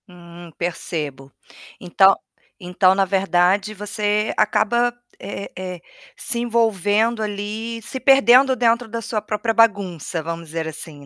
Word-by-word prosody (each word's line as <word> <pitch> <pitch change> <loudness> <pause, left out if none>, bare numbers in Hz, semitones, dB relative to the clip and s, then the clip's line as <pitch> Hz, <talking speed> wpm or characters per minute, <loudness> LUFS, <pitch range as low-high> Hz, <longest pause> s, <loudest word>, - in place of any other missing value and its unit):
Hum, 175 -2 -13
percebo. 150 -5 -5 0.5
Então 190 +2 +4 0.4
então 185 +1 +2
na 195 0 +2
verdade 190 +1 +1
você 210 +1 -1
acaba, 235 +3 +2 0.3
é 200 0 -7
é 185 -1 -6
é, - - -23 0.3
se 250 - -1
envolvendo 225 -1 +1
ali, 215 +3 -5
se 235 +4 -5
perdendo 265 -1 +5
dentro 235 0 +1
da 230 +1 -5
sua 225 -2 -3
própria 215 +2 -2
bagunça, 195 -8 +1
vamos 165 +1 -6
dizer 160 +1 -4
assim, 155 -2 -8
205 Hz, 130 wpm, -21 LUFS, 175-230 Hz, 0.5 s, perdendo